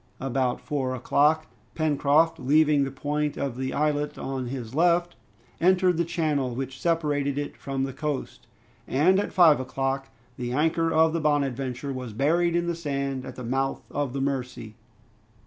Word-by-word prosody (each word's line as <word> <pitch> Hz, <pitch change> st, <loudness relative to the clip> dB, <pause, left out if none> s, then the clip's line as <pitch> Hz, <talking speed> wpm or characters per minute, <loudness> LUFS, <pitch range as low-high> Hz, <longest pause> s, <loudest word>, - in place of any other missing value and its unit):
About 130 Hz, -1 st, -1 dB
four 135 Hz, -4 st, -2 dB
o'clock, 150 Hz, +5 st, +2 dB, 0.3 s
Pencroft 155 Hz, +1 st, +2 dB
leaving 150 Hz, +1 st, +3 dB
the -, -, -3 dB
point 145 Hz, +2 st, -2 dB
of 135 Hz, -4 st, -2 dB
the 130 Hz, +1 st, -3 dB
islet 150 Hz, 0 st, 0 dB
on 130 Hz, -2 st, -4 dB
his 120 Hz, -2 st, -6 dB
left, 175 Hz, +2 st, +2 dB, 0.4 s
entered 180 Hz, 0 st, +3 dB
the 170 Hz, -, +2 dB
channel 150 Hz, -7 st, -1 dB
which 130 Hz, +1 st, -5 dB
separated 145 Hz, -4 st, 0 dB
it 145 Hz, 0 st, -3 dB
from 135 Hz, -1 st, -3 dB
the 135 Hz, -1 st, -3 dB
coast, 150 Hz, -1 st, -4 dB, 0.4 s
and 175 Hz, +8 st, +3 dB
at 205 Hz, -, -2 dB
five 170 Hz, -6 st, +6 dB
o'clock 135 Hz, +1 st, -2 dB, 0.3 s
the 120 Hz, -1 st, -3 dB
anchor 165 Hz, +3 st, +1 dB
of 160 Hz, 0 st, +4 dB
the 165 Hz, -, -1 dB
"Bonadventure" 135 Hz, -3 st, -1 dB
was 125 Hz, -4 st, -6 dB
buried 170 Hz, +8 st, +2 dB
in 175 Hz, 0 st, +1 dB
the 170 Hz, -, -1 dB
sand 140 Hz, -5 st, -3 dB
at 130 Hz, -, -8 dB
the 125 Hz, -, -7 dB
mouth 135 Hz, +3 st, -1 dB
of 140 Hz, -3 st, -2 dB
the 135 Hz, -, -2 dB
Mercy. 125 Hz, -5 st, -3 dB
140 Hz, 165 wpm, -26 LUFS, 130-160 Hz, 0.4 s, five